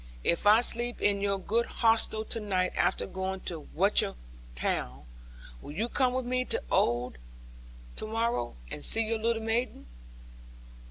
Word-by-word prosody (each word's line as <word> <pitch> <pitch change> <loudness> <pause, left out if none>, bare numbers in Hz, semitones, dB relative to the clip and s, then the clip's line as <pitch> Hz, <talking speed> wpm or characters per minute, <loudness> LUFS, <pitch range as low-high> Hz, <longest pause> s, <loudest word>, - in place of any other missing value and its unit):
If 170 +4 +2
I 215 +3 +7
sleep 240 0 +1
in 200 -1 +1
your 200 -1 +1
good 225 +5 0
hostel 225 -1 +1
to 230 - -3
night 185 -4 0
after - - +1
going 190 0 -4
to 165 -4 -6
Watchett 195 - +3 0.4
town, 65 +2 -3 0.6
will 145 - -9
you 215 +9 -1
come 255 -1 +1
with 260 -1 -2
me 255 +1 0
to 465 - 0
Oare 120 +1 +1 0.8
to - - -4
morrow, 220 - -1 0.2
and - - -6
see 225 - +4
your 225 0 -1
little 225 0 0
maiden?' 225 - -2
215 Hz, 155 wpm, -29 LUFS, 190-235 Hz, 0.8 s, I